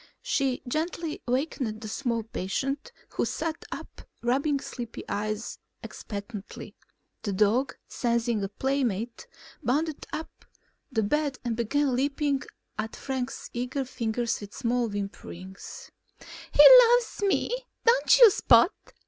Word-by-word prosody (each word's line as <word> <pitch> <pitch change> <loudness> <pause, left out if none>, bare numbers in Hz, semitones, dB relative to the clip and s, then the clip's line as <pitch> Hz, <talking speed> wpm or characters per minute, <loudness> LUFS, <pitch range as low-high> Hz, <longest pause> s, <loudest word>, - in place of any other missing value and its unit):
She 275 - 0
gently 320 +3 -2
wakened 250 -4 -1
the 220 - -6
small 230 0 -2
patient, 270 - -3 0.2
who - - -1
sat 330 -1 -3
up - - -8 0.2
rubbing 275 +4 +1
sleepy 240 -4 -7
eyes 215 +2 -3 0.2
expectantly. 205 0 -8 0.5
The 205 - -2
dog, 215 +7 +2
sensing 235 -3 0
a 195 - -2
play 270 +6 0
mate, 230 +1 -3 0.3
bounded 300 +3 -1
upon 320 - -3 0.7
the 220 -3 +1
bed 285 +4 0
and 235 -2 0
began 260 +4 +1
lapping 280 +1 0 0.4
at 220 +1 -3
Frank's 265 -1 -4
eager 250 +3 -2
fingers 235 -2 -2
with 205 0 -9
small 240 -2 0
whimperings. 195 -2 -7 0.6
"He - - +7 0.3
loves 485 -3 +2
me. 400 +2 +1 0.3
Don't - - +5
you, 475 -4 +9
Spot? 235 - +5
245 Hz, 125 wpm, -27 LUFS, 220-285 Hz, 0.7 s, you